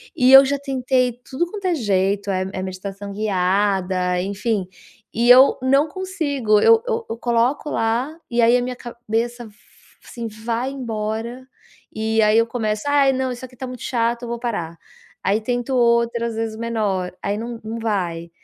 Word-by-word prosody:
e 255 0 +4
eu 270 +1 +10
já 280 +1 0
tentei 255 -3 0
tudo 270 +6 -1
quanto 405 -2 -7
é 360 -2 +2
jeito, 200 -4 0
eh, 185 0 -1
é 185 - -4
meditação 195 +2 -6
guiada, 190 -2 0
enfim, 200 +1 -2 0.5
e 235 +2 +1
eu 260 +2 +8
não 275 +4 +3
consigo, 285 - 0
eu 455 0 +6
eu 465 -1 -1
eu 225 - -4
coloco 240 +5 0
lá 235 +6 0 0.2
e 235 - +2
aí 235 +1 +5
a - - 0
minha 250 0 -3
cabeça 240 0 -4
f 210 -2 -15 0.5
assim, 235 -1 -6
vai 230 +4 -3
embora 235 0 -4 0.4
e 220 0 0
aí 215 +1 +4
eu 230 - +4
começo: 215 -3 -2
"Ai 285 -1 +4
não, 260 -1 -1
isso 245 +1 -8
aqui 255 0 -15
tá 260 - -6
muito 250 -1 -8
chato, 235 0 -1
eu - - -5
vou 235 - -3
parar", 175 -9 -4 0.5
aí 205 +2 +2
tento 245 +2 -2
outra 235 -1 +2
as 230 - -5
vezes 225 -1 -3
menor, 210 -6 -2
aí 200 +1 -1
não 230 +1 -6
não 225 +1 -5
vai. 175 -7 -2
230 Hz, 180 wpm, -21 LUFS, 210-255 Hz, 0.5 s, eu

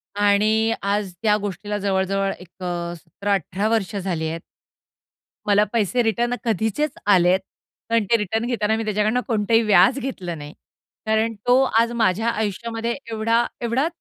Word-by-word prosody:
आणि 215 +2 +3
आज 200 -1 -1
त्या 210 -1 +4
गोष्टीला 205 +1 -4
जवळ-जवळ 195 0 0
एक 185 +1 -14
अ, 175 -1 -3
17-18 200 +3 -2
वर्ष 220 -3 0
झाली 180 -5 -2
आहेत. 165 +1 -5 1.0
मला 205 0 +4
पैसे 230 +2 +1
रिटर्न 240 +2 0
कधीचेच 225 - 0 0.2
आलेत 180 +1 +4 0.5
आणि 230 -2 +2
ते 230 - +6
रिटर्न 220 +2 -1
घेताना 220 -3 0
मी 225 - -2
त्याच्याकडनं 215 +3 +1
कोणतंही 225 +1 +2
व्याज 215 +6 +4
घेतलं 185 -11 -5
नाही. 145 0 -9 0.5
कारण 220 +1 +1
तो 250 +2 +5 0.2
आज 230 +1 +2
माझ्या 220 +2 +2
आयुष्यामध्ये 225 +2 -2 0.2
एवढा 230 +2 +1 0.2
एवढा 245 +6 +1
210 Hz, 140 wpm, -22 LUFS, 195-230 Hz, 1.0 s, ते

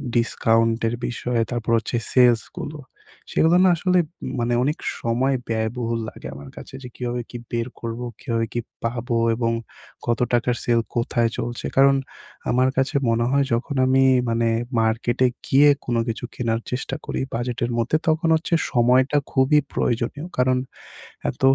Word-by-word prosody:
ডিসকাউন্টের 115 0 +2
বিষয়ে 120 -1 -1
তারপর 120 -1 -2
হচ্ছে 115 - -3 0.2
সেলসগুলো। 125 +4 +2 0.5
সেগুলো 165 +2 +4
না 190 - +6
আসলে 180 +2 +2 0.4
মানে 120 +1 0
অনেক 150 +4 0 0.2
সময় 125 +4 +1
ব্যয়বহুল 115 +1 -1
লাগে - - -10
আমার 70 0 -10
কাছে - - -10
যে 125 - -6
কীভাবে 120 -1 -3
কী 120 - -6
বের 115 0 -1
করবো 115 +1 -4
কিভাবে 115 -1 -1
কি 120 - -1 0.2
পাবো 120 +1 -1 0.2
এবং 115 0 0 0.5
কত 120 -1 0
টাকার 120 0 +2
সেল 120 -1 +3 0.2
কোথায় 120 0 +1
চলছে 120 0 -4
কারণ 135 0 +6 0.5
আমার 130 +1 +3
কাছে 135 +3 +1
মনে 115 +1 +2
হয় 140 0 +3
যখন 120 +4 -1
আমি 130 +1 +4 0.3
মানে 115 0 +1 0.3
মার্কেটে 120 +3 +1 0.2
গিয়ে 145 +2 +6 0.2
কোনো 120 -1 0
কিছু 115 +1 -3
কেনার 115 -2 0
চেষ্টা 125 +2 -3
করি। - - -3
বাজেটের 120 0 -2
মধ্যে 120 +6 +2
তখন 160 +1 +2
হচ্ছে 160 +2 -2 0.2
সময়টা 130 +3 +3
খুবই 135 +3 +4
প্রয়োজনীয়। 125 +7 -1
কারণ 130 0 +3 0.7
এত - - -8
120 Hz, 150 wpm, -23 LUFS, 115-130 Hz, 0.7 s, না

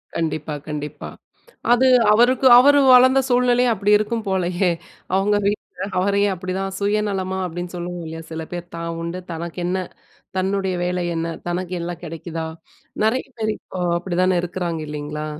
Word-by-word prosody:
கண்டிப்பா 155 -2 -2
கண்டிப்பா 150 -1 -5 0.6
அது 255 +2 +4 0.3
அவருக்கு 245 +4 +4
அவரு 285 +3 +6
வளந்த 260 +2 +6
சூழ்நிலையும் 245 -1 +3
அப்டி 205 +1 0
இருக்கும் 220 +1 -2
போலயே, 180 -1 +1 0.4
அவுங்க 200 +2 +2
வீட்ல 200 -2 -3
அவரையும் 200 +1 +2
அப்டிதான், 190 +1 -4
"சுயநலமா" 200 -2 -1
அப்டின்னு 175 +1 -6
சொல்லுவோம் 175 -1 -5
இல்லையா, 165 +1 -7
சில 160 0 -4
பேர் 175 0 -6
தான் 170 0 -4
உண்டு! 170 +2 -4
தனக்கென்ன? 175 +2 -3 0.5
தன்னுடைய 190 0 0
வேலை 180 0 -1
என்ன? 165 0 -2
தனக்கு 180 +1 -3
எல்லாம் 175 0 -5
கெடைக்குதா? 165 0 -5 0.6
நெறையா 255 +4 0
பேர் 215 -1 0
இப்போ 185 - -9 0.2
அப்டிதானே 185 0 +1
இருக்குறாங்க 170 -2 -3
இல்லைங்களா? 150 0 -5
185 Hz, 135 wpm, -21 LUFS, 170-205 Hz, 0.6 s, அவரு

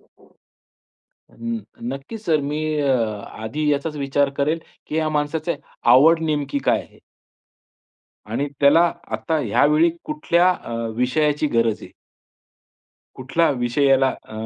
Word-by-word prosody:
हं. - - -29 1.4
नक्कीच 140 +11 -8
सर 155 -4 +2
मी 150 +1 -2 0.2
अ, 140 - 0 0.6
आधी 150 +7 -1
याचाच 145 +2 -2
विचार 140 0 +1
करेल, 150 +4 +1 0.3
की - - -4
ह्या 160 -1 +1
माणसाची 155 +3 -1 0.4
आवड 160 +5 +6
नेमकी 145 -2 -1
काय - - +2
आहे? - - -19 1.3
आणि 130 +6 -1
त्याला 165 +5 +5 0.2
आता 110 +9 -1
यावेळी 155 +3 +3
कुठल्या 185 - +2
अ, 180 - -5 0.2
विषयाची 150 +5 +1
गरज 115 -5 +1
आहे? - - -9 1.3
कुठला 150 +6 +1
विषय 125 +1 0
याला 135 -1 +4
अ, 130 - -8
145 Hz, 120 wpm, -21 LUFS, 135-160 Hz, 1.4 s, आवड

